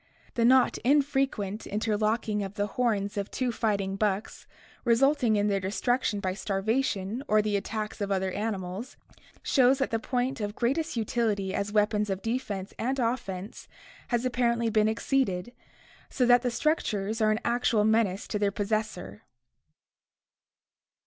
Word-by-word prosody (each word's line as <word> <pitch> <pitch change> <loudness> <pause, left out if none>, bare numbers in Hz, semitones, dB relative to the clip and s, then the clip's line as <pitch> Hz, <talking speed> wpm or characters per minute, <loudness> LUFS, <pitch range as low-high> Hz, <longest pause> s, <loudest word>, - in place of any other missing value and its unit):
The 235 - 0
not 260 +1 +4
infrequent 270 -7 +1
interlocking 215 0 0
of 195 0 -5
the 205 - 0
horns 205 -2 -1
of 200 -1 -2
two 255 -2 -1
fighting 200 -4 -1
bucks, 205 0 -2 0.4
resulting 245 0 +3
in 205 0 +2
their 200 -1 +1
destruction 205 +3 0
by 185 -2 -2
starvation 205 +2 -1
or 215 - +4
the 210 -1 0
attacks 215 +1 -3
of 200 0 -2
other 190 -1 0
animals, 200 +2 -4 0.5
shows 265 -1 +4
that 270 - -1
the 225 - 0
point 250 +2 -2
of 205 0 -3
greatest 270 +3 -1
utility 215 -4 0
as 200 +1 -2
weapons 210 0 +1
of 195 0 -3
defense 225 -5 -3
and 260 +4 -1
offense 230 -6 -3 0.4
has 240 0 0
apparently 235 -2 +1
been 215 0 +3
exceeded, 225 -3 0 0.6
so 255 - +1
that 245 0 +6
the 250 - 0
structures 225 -6 -1
are 215 - +4
an 215 0 +1
actual 235 -3 +2
menace 220 -3 +1
to 210 - -1
their 205 -1 +2
possessor. 205 - -3
215 Hz, 145 wpm, -28 LUFS, 200-245 Hz, 0.6 s, that